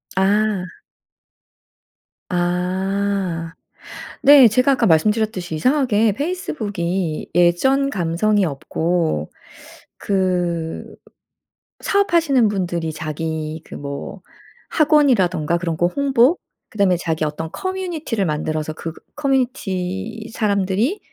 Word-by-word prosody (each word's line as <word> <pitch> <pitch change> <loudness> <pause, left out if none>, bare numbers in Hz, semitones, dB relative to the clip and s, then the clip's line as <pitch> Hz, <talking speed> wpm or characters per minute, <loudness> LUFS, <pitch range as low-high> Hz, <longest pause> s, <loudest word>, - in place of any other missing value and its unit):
아. 200 0 +1 1.7
아. 180 0 -1 0.7
네 280 -4 +8
제가 255 +5 +3
아까 245 -3 +1
말씀드렸듯이 185 0 +1
이상하게 225 - +2
페이스북이 200 - -3
예전 265 +11 +3
감성이 195 +1 +1
없고 160 - -1 0.7
그 180 -4 -1 1.0
사업하시는 330 - +2
분들이 175 -5 -2
자기 155 0 -4
그 - - -10
뭐 140 0 -7 0.5
학원이라든가 205 - +3
그런 170 -2 -3
거 175 - +2
홍보, 275 - +2 0.3
그다음에 200 -4 +2
자기 160 -2 -2
어떤 155 +2 -4
커뮤니티를 350 - -3
만들어서 155 0 -2
그 165 +1 -6 0.2
커뮤니티 225 -6 -2
사람들이 205 - 0
190 Hz, 225 characters per minute, -20 LUFS, 170-245 Hz, 1.7 s, 네